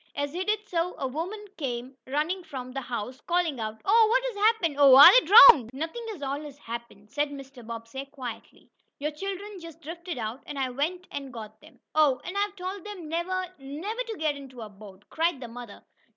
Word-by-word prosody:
As 285 Hz, 0 st, -3 dB
he 360 Hz, +2 st, -2 dB
did 425 Hz, +1 st, -1 dB
so 350 Hz, -1 st, -1 dB
a -, -, -3 dB
woman 355 Hz, +10 st, -5 dB
came 255 Hz, -2 st, -4 dB
running 310 Hz, +7 st, -1 dB
from 260 Hz, -6 st, -7 dB
the 270 Hz, +1 st, -4 dB
house, 250 Hz, 0 st, -6 dB
calling 345 Hz, -6 st, 0 dB
out: 220 Hz, 0 st, -5 dB
"Oh, 445 Hz, +2 st, +5 dB
what -, -, +3 dB
has -, -, -3 dB
happened? 410 Hz, -8 st, +2 dB
Oh, 275 Hz, -2 st, +8 dB
are 285 Hz, -, +11 dB
they -, -, -11 dB
drowned?" 365 Hz, -, +9 dB
"Nothing 325 Hz, -, -5 dB
at 295 Hz, -, -10 dB
all 280 Hz, +2 st, -3 dB
has 290 Hz, -2 st, -10 dB
happened," 230 Hz, -4 st, -9 dB
said 290 Hz, 0 st, 0 dB
Mr. 275 Hz, -3 st, -10 dB
Bobbsey, 230 Hz, +4 st, -7 dB
quietly. 260 Hz, -5 st, -10 dB, 0.3 s
"Your 300 Hz, +2 st, -3 dB
children 390 Hz, +4 st, -6 dB
just 330 Hz, -2 st, -11 dB
drifted 335 Hz, +1 st, -7 dB
out, 225 Hz, +3 st, -5 dB
and 290 Hz, -, -6 dB
I 260 Hz, -2 st, -1 dB
went 330 Hz, +8 st, -2 dB
and 275 Hz, -2 st, -6 dB
got 215 Hz, -2 st, -10 dB
them." 310 Hz, +1 st, -18 dB
"Oh, 300 Hz, -4 st, +3 dB
and 360 Hz, -, -6 dB
I've 405 Hz, 0 st, -1 dB
told 375 Hz, 0 st, -6 dB
them 375 Hz, -7 st, -8 dB
never, 365 Hz, +3 st, -2 dB
never 320 Hz, -, -5 dB
to 445 Hz, -2 st, -5 dB
get 310 Hz, -2 st, 0 dB
into 265 Hz, -3 st, -11 dB
a 215 Hz, -, -7 dB
boat!" 200 Hz, -1 st, -15 dB
cried 330 Hz, -2 st, 0 dB
the 245 Hz, -, -7 dB
mother. 235 Hz, -2 st, -10 dB
295 Hz, 210 wpm, -27 LUFS, 255-365 Hz, 0.3 s, are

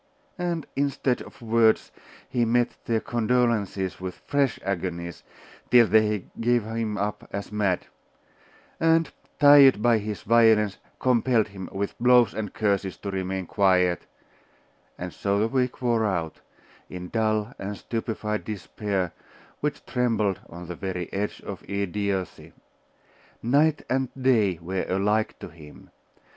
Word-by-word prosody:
And 170 Hz, -3 st, -2 dB
instead 140 Hz, -2 st, 0 dB
of -, -, -12 dB
words, 115 Hz, -1 st, +3 dB, 0.4 s
he 120 Hz, -, 0 dB
met 120 Hz, +1 st, +1 dB
their 115 Hz, -1 st, 0 dB
condolences 115 Hz, -6 st, 0 dB
with 95 Hz, -1 st, -5 dB
fresh 140 Hz, -3 st, +1 dB
agonies, 85 Hz, -3 st, -3 dB, 0.5 s
till 120 Hz, -1 st, +7 dB
they 105 Hz, -3 st, +2 dB
gave 120 Hz, 0 st, +2 dB
him 110 Hz, -1 st, -3 dB
up 105 Hz, +1 st, -3 dB
as 100 Hz, +1 st, -5 dB
mad; 100 Hz, -4 st, 0 dB, 0.9 s
and, 165 Hz, -2 st, +3 dB, 0.3 s
tired 145 Hz, -5 st, +8 dB
by 115 Hz, 0 st, +3 dB
his 105 Hz, -1 st, -5 dB
violence, 110 Hz, -3 st, +4 dB, 0.2 s
compelled 120 Hz, -3 st, +2 dB
him, 95 Hz, -2 st, -8 dB
with 100 Hz, +1 st, -3 dB
blows 125 Hz, -2 st, +5 dB
and 105 Hz, -2 st, -4 dB
curses, 100 Hz, -3 st, -1 dB
to 100 Hz, -, -5 dB
remain 95 Hz, 0 st, -3 dB
quiet; 90 Hz, -2 st, +2 dB, 0.9 s
and 90 Hz, -1 st, -6 dB
so 100 Hz, 0 st, 0 dB
the 105 Hz, +2 st, +2 dB
week 125 Hz, 0 st, -1 dB
wore 115 Hz, -2 st, +2 dB
out, 85 Hz, -5 st, -3 dB, 0.5 s
in 90 Hz, -1 st, -7 dB
dull 110 Hz, 0 st, 0 dB
and 100 Hz, +1 st, -5 dB
stupefied 110 Hz, -1 st, -3 dB
despair, 100 Hz, -3 st, -3 dB, 0.5 s
which 150 Hz, 0 st, -3 dB
trembled 115 Hz, -6 st, 0 dB
on 85 Hz, +1 st, -9 dB
the 90 Hz, -, -6 dB
very 90 Hz, -2 st, -5 dB
edge 100 Hz, +1 st, -3 dB
of 100 Hz, -, -7 dB
idiocy. 100 Hz, -1 st, -3 dB, 0.9 s
Night 145 Hz, +6 st, +3 dB
and 130 Hz, -1 st, 0 dB
day 110 Hz, -9 st, +3 dB
were 95 Hz, +2 st, -2 dB
alike 105 Hz, +3 st, +1 dB
to -, -, -9 dB
him. 75 Hz, -3 st, -15 dB
105 Hz, 130 wpm, -25 LUFS, 95-120 Hz, 0.9 s, tired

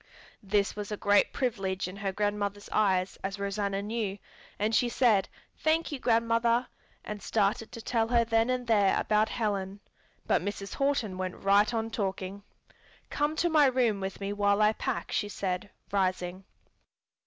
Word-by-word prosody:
This 200 Hz, 0 st, 0 dB
was 210 Hz, 0 st, -5 dB
a 210 Hz, -, -2 dB
great 205 Hz, 0 st, +3 dB
privilege 195 Hz, -8 st, -2 dB
in 185 Hz, +2 st, -8 dB
her 200 Hz, -1 st, -2 dB
grandmother's 205 Hz, 0 st, -2 dB
eyes, 190 Hz, -3 st, +1 dB
as 195 Hz, +1 st, -3 dB
Rosanna 200 Hz, 0 st, -2 dB
knew, 210 Hz, -2 st, -2 dB, 0.4 s
and 215 Hz, +2 st, 0 dB
she 240 Hz, +1 st, +3 dB
said, 225 Hz, -6 st, +3 dB, 0.3 s
"Thank 320 Hz, +1 st, +1 dB
you, 290 Hz, -, -4 dB
grandmother," 230 Hz, +1 st, +2 dB, 0.4 s
and 210 Hz, -1 st, -6 dB
started 215 Hz, +1 st, 0 dB
to 230 Hz, -2 st, -9 dB
tell 225 Hz, -2 st, +1 dB
her 235 Hz, 0 st, +3 dB
then 225 Hz, +1 st, +2 dB
and 255 Hz, -1 st, -1 dB
there 205 Hz, -4 st, +3 dB
about 215 Hz, +1 st, +2 dB
Helen. 200 Hz, -4 st, -2 dB, 0.5 s
But -, -, +2 dB
Mrs. 200 Hz, -1 st, -5 dB
Horton 275 Hz, -9 st, 0 dB
went 185 Hz, -1 st, -3 dB
right 200 Hz, +2 st, +3 dB
on 225 Hz, -1 st, -2 dB
talking. 195 Hz, -2 st, -3 dB, 0.7 s
"Come 295 Hz, +1 st, 0 dB
to 345 Hz, -, +1 dB
my 300 Hz, -3 st, +6 dB
room 245 Hz, -5 st, +2 dB
with 190 Hz, 0 st, -5 dB
me 200 Hz, 0 st, -3 dB
while 205 Hz, 0 st, +2 dB
I 215 Hz, 0 st, +4 dB
pack," -, -, -3 dB
she 205 Hz, -, -1 dB
said, 190 Hz, 0 st, -3 dB, 0.2 s
rising. 185 Hz, -1 st, -1 dB
205 Hz, 165 wpm, -29 LUFS, 195-230 Hz, 0.7 s, my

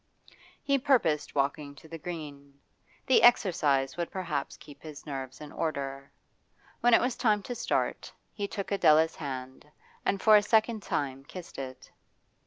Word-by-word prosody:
He 280 Hz, -1 st, +2 dB
purposed 240 Hz, -, +1 dB
walking 140 Hz, +1 st, -1 dB
to 160 Hz, -, -15 dB
the 165 Hz, +1 st, -8 dB
Green; 145 Hz, -4 st, -8 dB, 0.5 s
the 260 Hz, -, +5 dB
exercise 150 Hz, -, +3 dB
would 170 Hz, -1 st, -2 dB
perhaps 170 Hz, -7 st, -4 dB
keep 145 Hz, -1 st, -14 dB
his 155 Hz, -2 st, -10 dB
nerves 135 Hz, -3 st, -6 dB
in 150 Hz, -1 st, -9 dB
order. 140 Hz, -3 st, -4 dB, 0.7 s
When 240 Hz, -1 st, +5 dB
it -, -, +4 dB
was 250 Hz, 0 st, 0 dB
time 210 Hz, -4 st, +1 dB
to 245 Hz, -, -5 dB
start, -, -, -2 dB, 0.2 s
he 205 Hz, -2 st, -3 dB
took 200 Hz, 0 st, -5 dB
Adela's 160 Hz, -4 st, +4 dB
hand, 130 Hz, -2 st, -7 dB, 0.4 s
and 195 Hz, -, 0 dB
for 215 Hz, +2 st, +6 dB
a 210 Hz, -, +7 dB
second 220 Hz, +1 st, +2 dB
time 135 Hz, -6 st, -3 dB
kissed 180 Hz, -2 st, -9 dB
it. 130 Hz, -1 st, -8 dB
155 Hz, 155 wpm, -29 LUFS, 140-205 Hz, 0.7 s, a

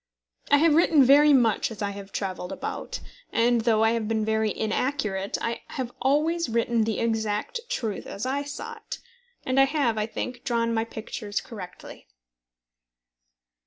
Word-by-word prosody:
I 285 Hz, -, +6 dB
have 320 Hz, +1 st, +4 dB
written 320 Hz, -2 st, +5 dB
very 290 Hz, +3 st, +7 dB
much 235 Hz, -6 st, +3 dB
as 220 Hz, -2 st, -6 dB
I 200 Hz, -, -1 dB
have 200 Hz, 0 st, -9 dB
travelled 185 Hz, -2 st, -4 dB
about; -, -, -5 dB, 0.3 s
and 235 Hz, 0 st, +3 dB
though 220 Hz, -1 st, +3 dB
I 225 Hz, -, +4 dB
have 230 Hz, -2 st, -1 dB
been 220 Hz, -1 st, 0 dB
very 220 Hz, 0 st, +1 dB
inaccurate, 215 Hz, -3 st, -1 dB
I 230 Hz, 0 st, -3 dB
have 255 Hz, -2 st, -4 dB
always 310 Hz, +4 st, +2 dB
written 230 Hz, 0 st, +1 dB
the 220 Hz, -1 st, -1 dB
exact 220 Hz, -, -1 dB
truth 225 Hz, -, -3 dB
as 200 Hz, -, -5 dB
I 270 Hz, +2 st, 0 dB
saw 370 Hz, +12 st, -7 dB
it; 435 Hz, -, -7 dB, 0.5 s
and 260 Hz, +1 st, +2 dB
I 270 Hz, -, +7 dB
have, 270 Hz, -6 st, 0 dB
I 210 Hz, -, 0 dB
think, 245 Hz, +2 st, -5 dB
drawn 230 Hz, -1 st, 0 dB
my 225 Hz, 0 st, 0 dB
pictures 215 Hz, -2 st, -5 dB
correctly. 195 Hz, -7 st, -10 dB
230 Hz, 160 wpm, -26 LUFS, 215-275 Hz, 0.5 s, very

